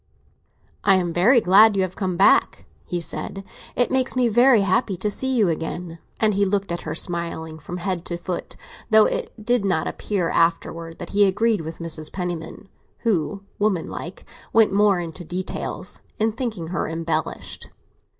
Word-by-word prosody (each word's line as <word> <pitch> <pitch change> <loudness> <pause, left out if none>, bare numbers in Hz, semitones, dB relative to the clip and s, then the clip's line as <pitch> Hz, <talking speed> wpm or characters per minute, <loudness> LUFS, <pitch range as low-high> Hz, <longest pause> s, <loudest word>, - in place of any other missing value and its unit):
"I 195 - +5
am 175 -2 0
very 230 +10 +5
glad 205 +3 +6
you 190 - +2
have 185 -1 -4
come 185 -3 -2
back," 195 - +4 0.2
he 175 - -3
said; 195 +3 -5 0.3
"it 245 - +2
makes 260 -1 +1
me 250 -1 +3
very 240 0 +5
happy 195 0 +1
to 210 +4 -1
see 265 +5 -1
you 230 -6 +3
again." 165 +1 -4 0.2
And 215 -1 +3
he 200 +1 +2
looked 200 -1 0
at 170 - -3
her, 160 0 -5
smiling, 165 -2 -3
from 175 +4 -7
head 180 -1 -3
to 175 - -3
foot; 175 +1 -5 0.3
though 220 -1 +7
it - - -2
did 240 -2 +2
not 185 -5 +1
appear, 185 -5 -2
afterwards, 165 0 0
that - - -8
he 205 0 +4
agreed 210 +1 +1
with 160 +1 -7
Mrs. 160 -2 -3
Penniman 175 +1 -5 0.3
(who, 200 -3 -1 0.2
womanlike, 185 -3 -2 0.3
went 225 -3 +4
more 200 -2 +4
into 170 +1 -6
details) 180 +3 -5 0.2
in 220 +1 +1
thinking 215 -8 -4
her 180 - -2
embellished. 165 -1 -3
185 Hz, 170 wpm, -23 LUFS, 170-210 Hz, 0.3 s, though